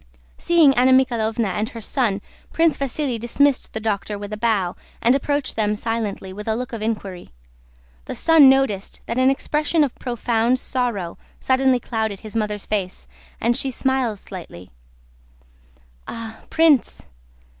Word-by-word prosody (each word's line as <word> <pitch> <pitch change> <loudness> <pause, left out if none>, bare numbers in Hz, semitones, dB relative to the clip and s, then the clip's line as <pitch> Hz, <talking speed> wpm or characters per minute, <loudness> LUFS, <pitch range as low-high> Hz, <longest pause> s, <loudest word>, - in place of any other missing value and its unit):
Seeing 330 -5 +5
Anna 255 +1 +4
Mikháylovna 230 -4 +2
and 210 +4 -2
her 230 - -8
son, 220 -3 0 0.3
Prince 325 -1 +3
Vasíli 275 -2 -2
dismissed 265 +4 +1
the 220 - -3
doctor 210 -1 -2
with 205 +1 -7
a - - -1
bow 210 -5 0 0.2
and 235 +2 +4
approached 285 0 -1
them 210 -1 +1
silently 215 -3 -3
and 190 - -11
with 210 - -7
a 220 - +1
look 250 +1 -5
of 225 - -4
inquiry. 200 -5 -4 0.8
The - - -5
son 320 -5 +6
noticed 265 -8 +1
that 230 +2 -2
an 260 +1 +5
expression 300 +3 +1
of 275 - -1
profound 240 0 0
sorrow 235 -10 -3 0.2
suddenly 260 -1 +2
clouded 220 -5 -3
his 215 0 -9
mother's 210 -2 -2
face, 195 -3 -3 0.3
and 235 +1 +1
he 270 +1 -1
smiled 260 -4 0
slightly. 170 - -10 1.4
"Ah, 225 -1 -8
Prince! 320 -6 +3
230 Hz, 150 wpm, -22 LUFS, 210-265 Hz, 1.4 s, son